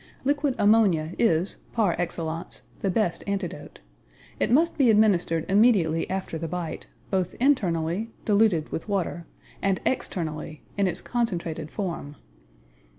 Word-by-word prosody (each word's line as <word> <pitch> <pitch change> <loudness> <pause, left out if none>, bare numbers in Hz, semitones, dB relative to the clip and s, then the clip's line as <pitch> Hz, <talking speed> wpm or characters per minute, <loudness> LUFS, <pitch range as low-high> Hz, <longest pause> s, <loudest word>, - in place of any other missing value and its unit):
Liquid 285 -1 +1
ammonia 200 -7 +4
is, 175 -4 +2 0.2
par 210 -7 +2
excellence, 165 -1 -3 0.2
the 195 - 0
best 185 -2 0
antidote. 200 -3 -4 0.6
It - - +1
must 320 +8 +3
be 270 -5 +4
administered 190 -7 +3
immediately 195 -6 +3
after 185 -4 -3
the 165 - -3
bite, 170 -1 -5 0.2
both 185 -2 0
internally, 195 - +1 0.2
diluted 205 -7 +3
with 165 - -5
water, 175 -4 -2 0.3
and 195 -1 +1
externally, 155 - -3
in 200 -1 +2
its 180 - -2
concentrated 170 -10 -2
form. 170 -7 -4
185 Hz, 125 wpm, -26 LUFS, 165-220 Hz, 0.6 s, ammonia